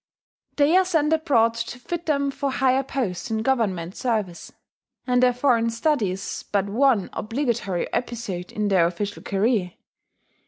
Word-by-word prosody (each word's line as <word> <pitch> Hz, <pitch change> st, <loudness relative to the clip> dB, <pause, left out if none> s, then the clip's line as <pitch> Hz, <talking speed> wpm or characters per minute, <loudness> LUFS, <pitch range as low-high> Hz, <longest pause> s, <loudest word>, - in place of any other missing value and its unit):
They 295 Hz, +3 st, +4 dB
are 375 Hz, -, +5 dB
sent 320 Hz, -4 st, +1 dB
abroad 265 Hz, -8 st, +3 dB
to 230 Hz, -, -5 dB
fit 340 Hz, +7 st, -5 dB
them 280 Hz, -2 st, +1 dB
for 280 Hz, 0 st, -2 dB
higher 260 Hz, 0 st, +2 dB
posts 255 Hz, -9 st, -3 dB
in 220 Hz, -1 st, -1 dB
Government 200 Hz, -9 st, 0 dB
service; 215 Hz, -8 st, -2 dB, 0.5 s
and 250 Hz, -1 st, +2 dB
their 250 Hz, 0 st, +5 dB
foreign 245 Hz, -2 st, +2 dB
study 230 Hz, -2 st, +1 dB
is 190 Hz, +2 st, -5 dB
but 200 Hz, -2 st, +1 dB
one 225 Hz, 0 st, +2 dB
obligatory 225 Hz, -6 st, -2 dB
episode 225 Hz, -8 st, -3 dB
in 210 Hz, -1 st, -1 dB
their 180 Hz, -4 st, +4 dB
official 200 Hz, +4 st, -4 dB
career. 200 Hz, -3 st, 0 dB
230 Hz, 150 wpm, -24 LUFS, 200-270 Hz, 0.5 s, are